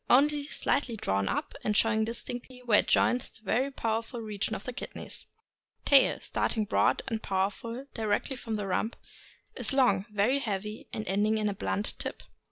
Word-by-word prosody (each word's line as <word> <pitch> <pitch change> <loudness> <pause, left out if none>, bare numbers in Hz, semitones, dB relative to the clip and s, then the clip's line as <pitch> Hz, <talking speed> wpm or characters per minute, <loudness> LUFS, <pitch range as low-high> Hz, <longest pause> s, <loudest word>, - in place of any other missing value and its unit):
— - - -36
Only 290 +3 +4
slightly 255 -6 0
drawn 100 - 0
up, - - -2
and 210 -1 +1
showing 220 -1 +3
distinctly 245 +2 -5
where 225 -4 +5
it - - +1
joins 245 0 +3
the 225 - -16
very 245 +7 +1
powerful 230 -2 -2
region 220 0 -2
of 200 - -6
the 250 - -5
kidneys. - - -5 0.6
Tail. 275 -2 +6
— - - -24
Starting 220 -2 -1
broad - - +2
and 225 -1 -2
powerful 205 +6 -2
directly 220 +4 0
from 230 -4 -4
the 205 -1 -2
rump, 210 +4 -1 0.6
is - - +1
long, 210 -7 +3
very 210 +7 +2
heavy, 210 -3 -4
ending 215 +1 +1
in 215 -1 +1
a - - -1
blunt 200 +1 -2
tip. - - -4
220 Hz, 175 wpm, -29 LUFS, 210-245 Hz, 0.6 s, Tail